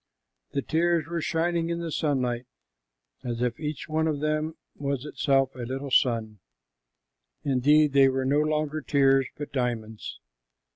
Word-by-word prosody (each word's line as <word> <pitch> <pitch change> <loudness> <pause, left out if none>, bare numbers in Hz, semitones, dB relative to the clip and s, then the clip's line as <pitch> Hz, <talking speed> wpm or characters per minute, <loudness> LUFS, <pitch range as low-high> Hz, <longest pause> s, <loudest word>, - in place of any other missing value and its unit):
The 140 - -1
tears 170 0 +1
were 170 +1 -3
shining 165 +1 0
in 170 - -1
the 170 -1 -4
sunlight 125 -6 -1 0.8
as 120 -2 -3
if 120 -1 -1
each 150 -1 -4
one 160 0 0
of 150 -2 -1
them 155 +1 -1 0.2
was 140 -1 -3
itself 135 -3 +1
a 125 - -13
little 130 +3 -4
sun. 115 -6 +2 1.0
Indeed, 145 +2 +4
they 135 -1 +6
were 130 0 -1
no 140 +3 +3
longer 155 0 0
tears, 135 -2 +3
but 145 -2 -7
diamonds. 115 -4 -3
140 Hz, 145 wpm, -27 LUFS, 130-155 Hz, 1.0 s, they